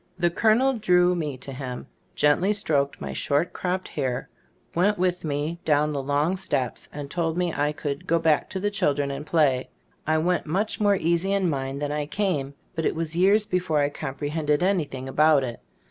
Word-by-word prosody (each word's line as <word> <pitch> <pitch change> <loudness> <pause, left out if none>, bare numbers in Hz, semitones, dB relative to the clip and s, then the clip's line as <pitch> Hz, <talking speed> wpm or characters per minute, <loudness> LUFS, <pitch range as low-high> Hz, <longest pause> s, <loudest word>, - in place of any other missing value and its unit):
The 175 -1 +2
col 215 +5 +4
onel 260 -1 +1
drew 180 -2 +4
me 150 -6 -3
to 135 +1 -8
him, 130 -1 -6 0.3
gently 175 +8 +3
stroked 145 -9 0
my - - -5
short 145 +4 0
cropped 185 +1 -2
hair, 125 -2 -3 0.4
went 200 +5 +2
with 180 0 0
me 155 +2 -2
down 150 0 +2
the 140 - -1
long 145 +7 0
steps, 150 -10 -2
and 145 -1 -6
told 165 +2 -2
me 180 -2 0
I 145 +1 +1
could 145 -2 -5
"go 170 - +3
back 160 -2 +2
to 190 - -3
the 205 +2 -1
children 145 -8 0
and 150 +2 -6
play." 140 -6 +2 0.4
I 160 0 +3
went 175 +1 0
much 195 +7 -1
more 205 -1 +4
easy 170 +2 +1
in 195 -2 +2
mind 135 0 -3
than 145 - -1
I 150 0 -2
came, 150 -7 -1 0.2
but 165 -3 -2
it - - -1
was 165 0 -3
years 200 +4 +4
before 180 -5 0
I 145 -1 +3
comprehended 150 +2 -2
anything 150 -9 -1
about 150 +1 +4
it. 120 -2 -5
160 Hz, 195 wpm, -25 LUFS, 145-180 Hz, 0.4 s, col